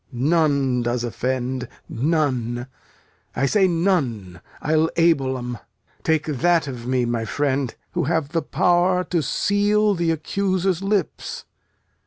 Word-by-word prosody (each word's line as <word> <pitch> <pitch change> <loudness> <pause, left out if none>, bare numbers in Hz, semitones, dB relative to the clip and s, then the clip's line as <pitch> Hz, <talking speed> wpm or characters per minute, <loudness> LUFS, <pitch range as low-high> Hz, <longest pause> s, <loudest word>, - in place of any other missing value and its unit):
None 140 -2 +2
does 120 0 -1
offend, 125 +2 -2 0.2
none 125 -4 0 0.7
I 135 - +1
say 190 +6 +3
none! 135 - 0 0.2
I'll 155 +2 +2
able 140 -6 +2
'em. 125 -2 -5 0.4
Take 160 -1 +1
that 160 +2 +2
of 125 -3 -6
me, 125 -1 +1
my 120 -1 -1
friend, 135 +1 -1 0.2
who - - -1
have 160 -1 0
the 165 +1 0
power 180 +4 +2
To 175 -2 -1
seal 205 +8 +2
th' 170 -1 0
accuser's 185 +2 0
lips. 200 0 -2
145 Hz, 125 wpm, -22 LUFS, 125-175 Hz, 0.7 s, say